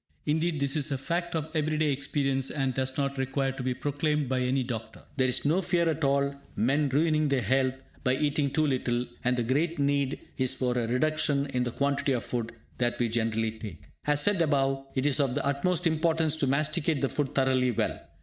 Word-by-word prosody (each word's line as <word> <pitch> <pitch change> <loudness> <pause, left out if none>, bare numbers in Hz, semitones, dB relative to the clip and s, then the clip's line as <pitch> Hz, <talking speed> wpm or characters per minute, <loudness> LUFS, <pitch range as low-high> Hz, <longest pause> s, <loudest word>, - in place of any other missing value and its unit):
Indeed, 160 +1 0
this 140 +1 +1
is 150 -1 +1
a 140 - -1
fact 170 +5 -2
of 160 -1 -1
everyday 155 -1 +1
experience, 135 -1 0
and 135 -3 -1
does 130 +1 -2
not 140 -1 -1
require 135 +1 0
to 135 - -7
be 125 0 -1
proclaimed 145 +1 -1
by 130 0 0
any 130 +1 +1
doctor. 115 -3 -6
There 130 -2 +2
is 125 - 0
no 165 +6 +3
fear 170 -1 +1
at 160 -1 -1
all 140 0 +2
of 140 - -12 0.2
men 140 +6 +2
ruining 155 +2 +2
their 135 -3 +1
health 130 0 +2 0.3
by 130 0 +2
eating 145 0 +1
too 155 +3 +1
little; 125 -3 0 0.2
and 125 0 +2
the 120 - +1
great 150 +8 0
need 140 -1 0 0.2
is 130 -1 +2
for 125 -1 0
a 120 -2 0
reduction 140 +2 +1
in 125 -1 0
the 120 - -2
quantity 140 +1 0
of 120 - -1
food 115 -2 -3 0.3
that 120 -1 +1
we 120 -1 +1
generally 110 -1 0
take. 110 -6 -9 0.2
As 145 0 +4
said 205 -4 +3
above, 135 -3 +1
it 130 0 0
is 145 0 +2
of 135 -3 +1
the 145 - -1
utmost 165 +5 +1
importance 160 -1 +2
to 145 - 0
masticate 150 +2 +1
the 135 - +2
food 145 -1 -2
thoroughly 130 -1 +3
well. 120 - -1
140 Hz, 215 wpm, -28 LUFS, 130-150 Hz, 0.3 s, As